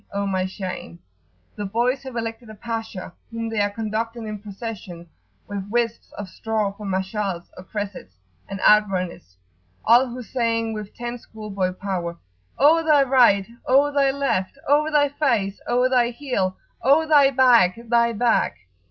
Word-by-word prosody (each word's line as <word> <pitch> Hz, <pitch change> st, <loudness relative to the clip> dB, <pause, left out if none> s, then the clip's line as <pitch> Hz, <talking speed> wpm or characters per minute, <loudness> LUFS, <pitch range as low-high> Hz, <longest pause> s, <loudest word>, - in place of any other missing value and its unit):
O 200 Hz, 0 st, -2 dB
my 190 Hz, -1 st, 0 dB
shame!" 185 Hz, -, -6 dB, 0.6 s
The 205 Hz, -, -4 dB
boys 240 Hz, +6 st, 0 dB
have 265 Hz, -2 st, -9 dB
elected 225 Hz, 0 st, -5 dB
a 215 Hz, -, -10 dB
Pasha, 225 Hz, -5 st, -5 dB, 0.2 s
whom 230 Hz, 0 st, -4 dB
they 220 Hz, -2 st, 0 dB
are 205 Hz, -, +2 dB
conducting 225 Hz, +2 st, -3 dB
in 215 Hz, -1 st, -5 dB
procession, 195 Hz, -4 st, -8 dB, 0.4 s
with 200 Hz, -1 st, -5 dB
wisps 235 Hz, 0 st, -1 dB
of 205 Hz, -, -5 dB
straw 215 Hz, +2 st, -2 dB
for 200 Hz, +1 st, -9 dB
Mash'als, 190 Hz, -1 st, -3 dB
or 185 Hz, -, -10 dB
cressets, 200 Hz, -, -6 dB, 0.3 s
and 195 Hz, -, -5 dB
outrunners, 185 Hz, -, +2 dB, 0.5 s
all 240 Hz, +4 st, +6 dB
huzzaing 230 Hz, -2 st, -2 dB
with 210 Hz, -1 st, -7 dB
ten 240 Hz, 0 st, -5 dB
schoolboy 200 Hz, -5 st, -4 dB
power. 180 Hz, -3 st, -4 dB, 0.4 s
"O 320 Hz, +4 st, +5 dB
thy 300 Hz, -3 st, +5 dB
right! 245 Hz, -7 st, +4 dB, 0.2 s
O 280 Hz, +3 st, +4 dB
thy 280 Hz, -1 st, +3 dB
left! 270 Hz, -7 st, -1 dB
O 300 Hz, +2 st, +3 dB
thy 295 Hz, -2 st, +3 dB
face! 235 Hz, -9 st, 0 dB
O 250 Hz, +1 st, +3 dB
thy 250 Hz, -2 st, +3 dB
heel! 235 Hz, -8 st, -2 dB, 0.2 s
O 285 Hz, +5 st, +4 dB
thy 290 Hz, -3 st, +6 dB
back, 245 Hz, -8 st, +5 dB
thy 235 Hz, 0 st, +3 dB
back!" 235 Hz, +2 st, +1 dB
225 Hz, 150 wpm, -23 LUFS, 195-250 Hz, 0.6 s, all